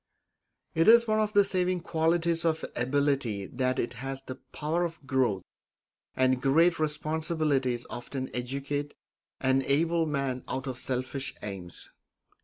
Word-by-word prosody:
It 165 0 +2
is 235 +1 +8
one 215 0 +2
of 215 0 0
the 205 - +6
saving 185 -2 0
qualities 165 0 +1
of 160 -1 0
ability 130 -5 0
that 130 +3 -1
it 120 - -1
has 135 0 -4
the 130 0 -7
power 160 +4 -1
of 165 -4 -5
growth, 125 -8 +1 0.7
and 130 -1 +2
great 165 +6 +4
responsibilities 155 -4 0
often 130 +2 -5
educate 140 +3 -3 0.5
an 130 0 +3
able 160 +4 +2
man 135 -4 -2
out 130 +1 -3
of 130 -2 -4
selfish 130 +1 -3
aims. 95 -4 -8
140 Hz, 135 wpm, -29 LUFS, 130-165 Hz, 0.7 s, is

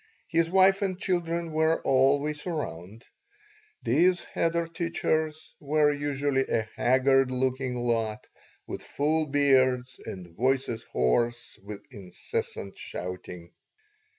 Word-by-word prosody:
His 165 0 +2
wife 190 +2 +5
and 190 -2 -1
children 170 -3 -1
were 160 +1 +2
always 140 +4 +2
around. 110 - -5 0.8
These 180 +1 +3
cheder 170 0 +1
teachers 160 -2 -2
were 150 0 +2
usually 145 -1 0
a 110 -1 0
haggard 135 +1 +3
looking 130 0 -1
lot 115 -3 -1 0.4
with - - -6
full 155 +2 0
beards 130 -3 +2
and 90 -3 -8
voices 130 -1 0
hoarse 115 - 0
with 100 +1 -9
incessant 95 0 -5
shouting. 90 -1 -7
135 Hz, 105 wpm, -27 LUFS, 120-160 Hz, 0.8 s, wife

